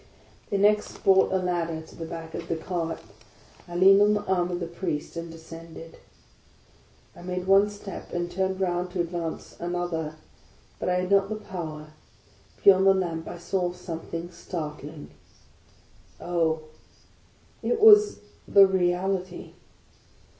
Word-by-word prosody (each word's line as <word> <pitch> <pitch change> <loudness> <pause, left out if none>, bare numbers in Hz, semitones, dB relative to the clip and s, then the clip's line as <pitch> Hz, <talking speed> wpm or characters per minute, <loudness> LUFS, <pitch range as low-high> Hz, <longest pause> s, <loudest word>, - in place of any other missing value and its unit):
They 200 - 0
next 210 +1 +2
brought 190 0 +5
a 190 - +2
ladder 175 -3 -1
to 160 - -13
the 165 - -6
back 165 0 -7
of 170 - -6
the 165 - -1
cart. 165 0 -3 0.7
I 175 - -8
leaned 195 +3 +7
on 210 0 +5
the 205 - -2
arm 180 -2 +1
of 175 -1 -3
the 175 - -3
Priest 170 -3 -4
and 170 0 -5
descended. 165 0 -11 1.2
I - - -12
made 180 0 -4
one 195 +2 +5
step, 205 -2 -9
and 175 0 -3
turned 190 +1 -1
round 180 -1 -1
to 185 - -3
advance 170 -1 -5
another, 175 -3 -3 0.6
but - - -1
I 180 0 +2
had 185 +1 -4
not 200 0 +4
the 215 - -2
power; 155 -7 -7 0.7
beyond 190 -1 +7
the 195 - +6
lamp 165 -4 -2
I 175 - -6
saw 175 +1 -1
something 170 -1 -6
startling.... 150 -3 -7 1.1
Oh, 165 -2 0 1.0
it 465 - 0
was 420 -1 +7 0.3
THE 200 -1 +8
REALITY! 185 0 -1
175 Hz, 145 wpm, -26 LUFS, 165-190 Hz, 1.2 s, THE